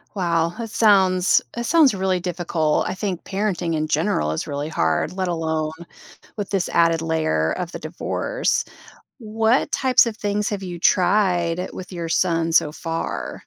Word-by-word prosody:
Wow. 170 -2 0
That 230 -2 -5
sounds 190 -5 +4
that 235 0 -4
sounds 315 -8 +5
really 190 -1 0
difficult. 170 -3 -1
I 185 - -3
think 190 -3 -4
parenting 190 -5 -1
in 155 0 -1
general 150 - 0
is 80 - -3
really 145 +1 -3
hard, 80 - 0
let 185 -1 -2
alone 160 -2 -1 0.7
with 205 -2 -4
this 190 -3 0
added 165 -1 +3
layer 155 - 0
of 180 -1 -4
the - - -5
divorce. - - -2 0.6
What 225 +2 0
types 255 -2 +4
of 220 -2 -4
things 205 +1 -1
have 200 -2 -4
you 175 -2 -6
tried 180 -2 +2
with 185 +1 -9
your 170 -2 -4
son 165 -2 +1
so 155 -2 +3
far? 165 - -4
175 Hz, 160 wpm, -22 LUFS, 165-200 Hz, 0.7 s, sounds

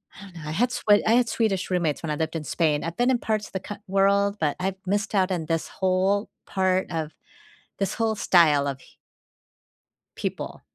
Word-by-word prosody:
I - - -13
don't 190 -3 -13
know, 155 -2 -8
I - - -3
had 240 +10 +1
Sw - - -4 0.2
I 220 - +4
had 245 -1 +3
Swedish 205 -5 0
roommates 175 -5 0
when 165 - -4
I 150 - 0
lived 160 +2 -2
in 160 - -3
Spain. 150 -3 +1
I've 165 0 -4
been 245 +2 +3
in 255 - +3
parts 215 -2 -1
of - - -18
the 190 - -2
cou 205 - -7
world, 200 +1 +2
but 150 -2 0
I've 190 +1 -1
missed 205 +3 -1
out 190 -2 +2
on 165 -3 -3
this 165 -1 -1
whole 190 +2 0 0.2
part 190 -1 0
of 160 -2 -3 0.7
this 195 -1 -1
whole 225 -1 0
style 155 -8 +4
of 135 -1 -4
h - - -20 1.2
people. - - -4
185 Hz, 210 wpm, -25 LUFS, 165-200 Hz, 1.2 s, I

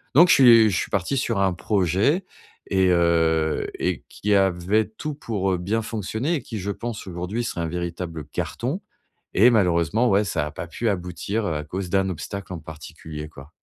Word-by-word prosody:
Donc, 175 +4 +8
je - - +8
suis 115 -5 +7
je 90 - 0
suis - - -2
parti 100 +8 0
sur 115 -5 0
un 95 -2 +2
projet 100 - +1 0.4
et 95 -1 +2
heu 80 -2 +2
et - - -1
qui 105 0 -1
avait 95 +2 +2
tout 150 +8 -6
pour, 105 -9 -2
heu, - - 0
bien 100 +6 -1
fonctionner 110 - -2
et 145 - -2
qui, 115 -3 -7
je 100 +2 -3
pense, 115 +1 -5
aujourd'hui, 90 +6 -3
serait 90 - -4
un 85 - -1
véritable 85 -1 -4
carton 135 - -3 0.5
et 115 +6 +6
malheureusement, 95 +2 +2
ouais, 100 +2 +4
ça 80 -4 -1
a 75 - -6
pas 80 +3 -7
pu 115 +8 -3
aboutir, 95 +3 -2
heu, 80 - -1
à 75 - -3
cause 90 +3 -5
d'un 95 +1 +1
obstacle 95 +2 -6
en 85 - -5
particulier, 75 0 -9
quoi. 70 0 -13
95 Hz, 195 wpm, -23 LUFS, 85-110 Hz, 0.5 s, Donc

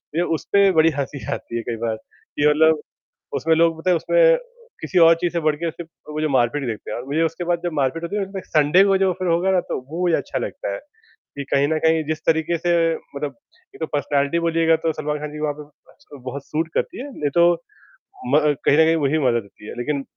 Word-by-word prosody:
ये 170 - +2 0.2
उसपे 200 +7 +3
बड़ी 160 -2 +4
हँसी 140 0 -4
आती - - -7
है - - -2
कई 115 - -2
बार 110 -1 -1
कि 145 +6 -4
मतलब 155 +1 +4 0.6
उसमें 160 +1 +2
लोग 165 0 +2
पता 185 +3 0
है 175 - +4
उसमें - - +4 0.4
किसी 185 - -1
और 165 0 +8
चीज़ 175 -1 0
से 170 - -1
बढ़के 155 +2 0
सिर्फ़ 165 0 -10 0.2
वो 155 - -3
जो 155 - 0
मार-पीट 130 +1 +1
देखते 110 -3 -5
हैं - - -3
और 125 - -7
मुझे 150 +4 0
उसके 165 +2 -2
बाद 175 0 0
जब 175 - -1
मार-पीट 140 +3 -1
होती 170 +4 -4
है 205 - 0
ना 195 - -4
उसमें 195 -2 -6
संडे 155 +5 +4
को 195 -1 +3
जो 190 -1 +2
फिर 185 -1 -2
होगा 175 +3 +2
ना 185 -1 +3
तो - - -1
वो 170 +3 -3
मुझे 175 -2 +3
अच्छा - - -3
लगता - - -4
है - - -4 0.6
कि 140 - -3
कहीं 140 +1 +3
न 160 0 +1
कहीं 160 0 +3
जिस 155 0 -1
तरीक़े 160 +1 +2
से 175 +1 0 0.4
मतलब 145 0 -4 0.4
ये - - -13
तो - - -2
पर्सनैलिटी 145 +2 0
बोलिएगा 165 -1 +2
तो 160 - +2
सलमान 150 0 -3
खान 150 0 -6
जी 150 - -7
वहाँ 150 -1 -1
पे 150 - -10 0.3
आजकल 145 - -16
बहुत 140 +2 -6
सूट 160 +2 -2
करती - - -2
है 285 - -8
नहीं 145 -8 -2
तो 170 0 +6 0.8
म - - +7 0.3
कहीं 145 - +5
न 160 - +7
कहीं 165 - +3
वही 150 0 +1
मदद 120 -5 +1
होती 100 +1 -16
है, - - -6
लेकिन 140 +3 -2
160 Hz, 245 wpm, -21 LUFS, 145-170 Hz, 0.8 s, और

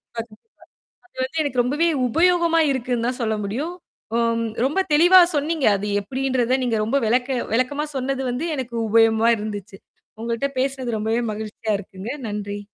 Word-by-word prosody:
அதும் 225 -2 -7 0.5
தான் - - -30
அது - - -19
வந்து 315 +5 -3
எனக்கு 270 -4 0
ரொம்பவே 295 +7 +1 0.2
உபயோகமா 340 +2 +3
இருக்குன்னு 245 -2 -1
தான் 250 - -3
சொல்ல 220 -1 0
முடியும். 280 - -3 0.4
ஓ - - +2 0.5
ரொம்ப 295 +8 0
தெளிவா 350 +5 +7
சொன்னீங்க. 300 0 0
அது 200 +1 -4
எப்படின்றத 260 +3 0
நீங்க 240 -3 0
ரொம்ப 230 +6 0
வெளக்க 250 +3 +1
வெளக்கமா 255 +5 0
சொன்னது 265 +1 -2
வந்து 265 +8 -2
எனக்கு 250 -2 -5
உபயோகமா 225 +1 +4
இருந்துச்சு. 205 -2 -6 0.4
உங்கள்ட்ட 235 +3 -1
பேசினது 260 -3 -1
ரொம்பவே 220 +3 0
மகிழ்ச்சியா 215 +1 -4
இருக்குங்க. 190 +3 -8 0.2
நன்றி. 205 -1 -4
245 Hz, 150 wpm, -22 LUFS, 220-275 Hz, 0.5 s, தெளிவா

